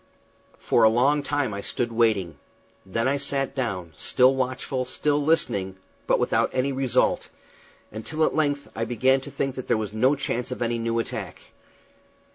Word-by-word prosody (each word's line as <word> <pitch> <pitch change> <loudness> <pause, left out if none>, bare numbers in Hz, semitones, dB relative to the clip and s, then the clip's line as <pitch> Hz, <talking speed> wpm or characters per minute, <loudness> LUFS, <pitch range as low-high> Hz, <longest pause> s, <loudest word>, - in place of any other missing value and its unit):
For - - +1
a 110 - +7
long 135 +6 +3
time 145 -5 -1
I 100 - -4
stood 120 +3 -2
waiting; 110 -7 +1 0.5
then 115 +6 0
I 140 +1 +2
sat 140 -1 -2
down, 95 - -3
still 125 +3 +3
watchful, 130 0 -2
still 145 +3 0
listening, 100 - +1 0.3
but - - +4
without - - +1
any 130 +2 0
result, 130 -2 +1 0.6
until 145 +9 -2
at - - 0
length 145 -2 0
I 115 - -2
began 130 +3 +2
to - - -8
think 135 -1 -2
that 130 -1 -7
there - - +2
was 105 -2 -4
no 130 +6 +3
chance 125 -2 -3
of 125 -1 -3
any 115 0 -1
new 115 0 -1
attack. 115 - -4
125 Hz, 170 wpm, -25 LUFS, 115-135 Hz, 0.6 s, a